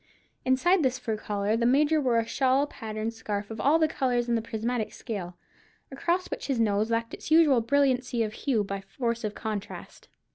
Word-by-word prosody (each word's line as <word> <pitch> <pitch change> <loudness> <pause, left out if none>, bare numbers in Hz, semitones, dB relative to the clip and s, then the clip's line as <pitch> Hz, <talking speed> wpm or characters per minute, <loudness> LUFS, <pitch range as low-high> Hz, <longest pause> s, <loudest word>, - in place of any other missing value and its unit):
Inside 335 +9 +3
this 260 -3 +1
fur 225 -3 -3
collar 205 0 -1
the 235 +1 +2
Major 300 +4 +3
wore 250 -4 +2
a 230 - +1
shawl 265 +3 +2
patterned 220 -4 -5
scarf 210 -2 -4
of 220 -1 -5
all 290 +7 +4
the 320 -1 +3
colours 245 -4 0
in 240 - +1
the 230 - +1
prismatic 225 0 -3
scale, 180 -7 -6 0.5
across 345 +7 -1
which - - -4
his 270 -4 0
nose 215 0 +2
lacked 230 0 -1
its - - -8
usual 310 -6 +5
brilliancy 255 -2 +1
of 215 -1 -4
hue 235 -4 0
by 195 0 -4
force 235 +4 -3
of 210 -1 -3
contrast. 215 -2 -6
235 Hz, 190 wpm, -27 LUFS, 215-270 Hz, 0.5 s, usual